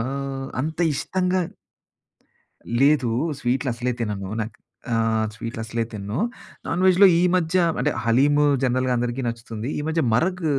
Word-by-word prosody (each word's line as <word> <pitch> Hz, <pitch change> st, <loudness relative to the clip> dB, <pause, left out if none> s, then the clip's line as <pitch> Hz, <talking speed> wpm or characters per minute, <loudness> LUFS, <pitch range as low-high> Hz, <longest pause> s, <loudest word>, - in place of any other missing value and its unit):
ఆహ్, 135 Hz, +2 st, -4 dB
అంత 160 Hz, +2 st, -4 dB, 0.2 s
ఇష్టంగా 180 Hz, +4 st, 0 dB, 1.4 s
లేదు. 140 Hz, -5 st, +4 dB, 0.3 s
స్వీట్లు 130 Hz, +2 st, 0 dB
అసలే 125 Hz, +1 st, -1 dB
తినను. 100 Hz, -3 st, -3 dB
నాకు 110 Hz, +1 st, -7 dB, 0.4 s
ఆహ్, 110 Hz, -1 st, +1 dB
స్వీట్లసలే 115 Hz, 0 st, -3 dB
తినను. 105 Hz, +3 st, -4 dB, 0.5 s
నాన్ 175 Hz, +2 st, -1 dB
వేజ్‌లో 190 Hz, +2 st, +7 dB
ఈ -, -, +2 dB
మధ్య 175 Hz, 0 st, 0 dB, 0.2 s
అంటే 145 Hz, +3 st, +1 dB
హలీము 145 Hz, +5 st, +4 dB, 0.2 s
జనరల్‌గా 130 Hz, 0 st, +1 dB
అందరికి 120 Hz, +2 st, -2 dB
నచ్చుతుంది. 115 Hz, 0 st, -5 dB
ఈ -, -, -1 dB
మధ్య 165 Hz, +1 st, +1 dB
మరగ్ 180 Hz, +6 st, 0 dB
130 Hz, 130 wpm, -23 LUFS, 115-155 Hz, 1.4 s, వేజ్‌లో